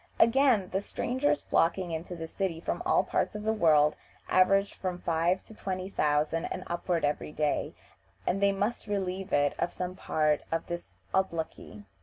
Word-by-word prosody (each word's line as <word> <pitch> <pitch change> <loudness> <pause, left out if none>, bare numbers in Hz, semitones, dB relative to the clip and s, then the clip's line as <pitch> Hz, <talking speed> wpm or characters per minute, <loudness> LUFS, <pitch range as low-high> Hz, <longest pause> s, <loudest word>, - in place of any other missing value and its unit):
Again, 230 -4 +4
the 195 - 0
strangers 260 +7 0
flocking 175 +1 +1
into 165 +2 -4
this 165 -1 -7
city 185 -5 -1
from - - -3
all - - +4
parts - - -1
of 210 - -5
the 220 +1 +1
world 155 -7 +4 0.3
average 195 +2 +4
from 185 -2 -3
five 170 +2 +1
to - - -14
twenty 185 -2 -4
thousand 150 0 +1
and 185 - -4
upward 175 -1 -1
every 145 +1 -2
day, 150 -1 -1 0.5
and 195 - 0
they 200 0 +5
must 205 +4 -2
relieve 190 -2 -2
it 145 0 +3
of 175 - 0
some 180 0 -4
part 155 -4 +1
of 165 0 -1
this 175 0 -6 0.2
obloquy. 160 - -2
180 Hz, 170 wpm, -29 LUFS, 160-195 Hz, 0.5 s, they